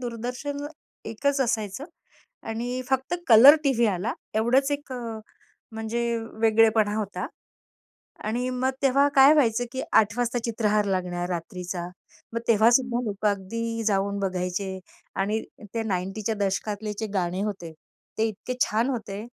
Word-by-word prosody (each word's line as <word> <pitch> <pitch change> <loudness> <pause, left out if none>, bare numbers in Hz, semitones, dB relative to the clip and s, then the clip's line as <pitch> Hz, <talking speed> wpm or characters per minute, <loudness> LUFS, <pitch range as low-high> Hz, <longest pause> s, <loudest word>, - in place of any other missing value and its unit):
दूरदर्शन 250 +5 -4 0.4
एकच 280 +5 0
असायचं 225 -1 -1 0.6
आणि 245 +3 -3
फक्त 265 +6 0
कलर 250 +6 +10
टीव्ही 240 -4 +3
आला 205 +3 -1 0.2
एवढंच 250 +6 +2
एक 285 -2 -4
अ, 230 -3 -5 0.5
म्हणजे 220 +2 -3 0.4
वेगळेपणा 220 -1 +4
होता 205 -2 -3 1.0
आणि 240 +4 -1
मग 255 +1 0
तेव्हा 275 +1 +4
काय 275 +1 +8
व्हायचं 245 -5 +2
की 260 - -3 0.2
8:00 210 +1 -2
वाजता 245 0 0
चित्रहार 215 -2 +1
लागणार 180 -2 -2
रात्रीचा. 175 0 -4 0.5
मग 230 - -1
तेव्हा 225 0 +5
सुद्धा 245 -1 +2
लोक 210 -1 -3
अगदी 230 +3 -2
जाऊन 200 0 +1
बघायचे 190 0 -2 0.4
आणि 210 +3 0 0.3
ते 230 - 0
90च्या 195 0 -3
च्या 220 +2 -1
दशकातले 205 +2 -2
जे 220 - -1
गाणे 180 -1 -1
होते, 195 -6 -4 0.5
ते 220 - +3
इतके 220 +4 -5
छान 230 +5 +2
होते. 215 -4 -5
220 Hz, 135 wpm, -25 LUFS, 200-245 Hz, 1.0 s, कलर